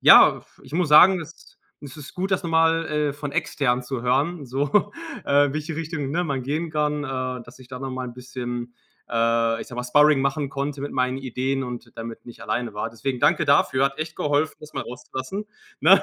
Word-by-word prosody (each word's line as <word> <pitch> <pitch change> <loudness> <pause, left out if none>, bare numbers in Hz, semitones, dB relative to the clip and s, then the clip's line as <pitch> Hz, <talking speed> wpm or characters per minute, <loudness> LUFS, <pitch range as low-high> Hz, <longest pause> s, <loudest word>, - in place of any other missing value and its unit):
ja, - - +8
f - - -23
ich - - -14
muss 175 -3 +1
sagen, 180 +4 +8
es 160 +1 -12 0.3
es 140 -3 -9
ist 145 - -10
gut, 190 +2 -2
das 190 - +1
noch 170 - -3
mal, 165 0 +3
äh, 150 -2 0
von 145 -1 -6
Extern 135 -6 0
zu 125 0 -4
hören, 140 +5 0
so, 140 +9 +1 0.4
äh, 145 0 +4
welche 155 +1 -4
Richtung, 160 -4 -3
ne, 175 +3 0
man 135 -4 -2
gehen 155 +5 -2
kann, 150 -1 0
äh, 130 -2 -3
dass 120 - -15
ich 130 -1 -15
da 130 -1 -7
noch 135 0 -5
mal 130 0 -4
'n 120 - -10
bisschen, 120 -1 -6 0.4
äh, 115 0 +2
ich - - -6
sage 120 - -9
mal, 125 - -3
Sparring 150 +2 +5
machen 140 +1 0
konnte 140 0 -3
mit 145 - -4
meinen 130 +1 0
Ideen 135 +1 -2
und 120 -1 -7
damit 115 0 -8
nicht 120 - -12
alleine 115 +1 -2
war. 105 - -3
Deswegen 125 +2 -4
danke - - +3
dafür, 135 -1 +3
hat 140 +1 -1
echt 160 0 -4
geholfen, 145 +2 +1
das 150 0 -12
mal - - -4
rauszulassen, 130 - -6 0.4
ne? - - +7
135 Hz, 215 wpm, -24 LUFS, 125-150 Hz, 0.4 s, ja